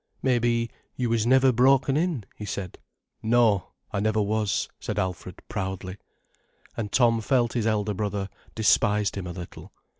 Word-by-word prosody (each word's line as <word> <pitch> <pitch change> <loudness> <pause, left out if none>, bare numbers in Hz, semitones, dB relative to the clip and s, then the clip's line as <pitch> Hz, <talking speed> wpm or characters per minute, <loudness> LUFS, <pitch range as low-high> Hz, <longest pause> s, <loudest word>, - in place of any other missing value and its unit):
"Maybe 120 -2 +1 0.2
you 120 -2 -1
was 115 -1 +1
never 130 +1 +5
broken 130 +2 +4
in," 160 - 0
he - - -9
said. 100 -3 -5 0.4
"No, 110 -4 +2 0.2
I - - -1
never 110 +1 +1
was," 105 -3 0
said - - -4
Alfred 95 -2 -4
proudly. 95 0 -4 0.8
And 105 -3 -4
Tom 115 -3 +3
felt 120 -1 +1
his 115 -3 0
elder 105 -1 0
brother 100 -1 -2 0.3
despised 105 -1 +3
him 95 -3 -4
a - - -5
little. 85 -1 -9
110 Hz, 150 wpm, -26 LUFS, 100-120 Hz, 0.8 s, never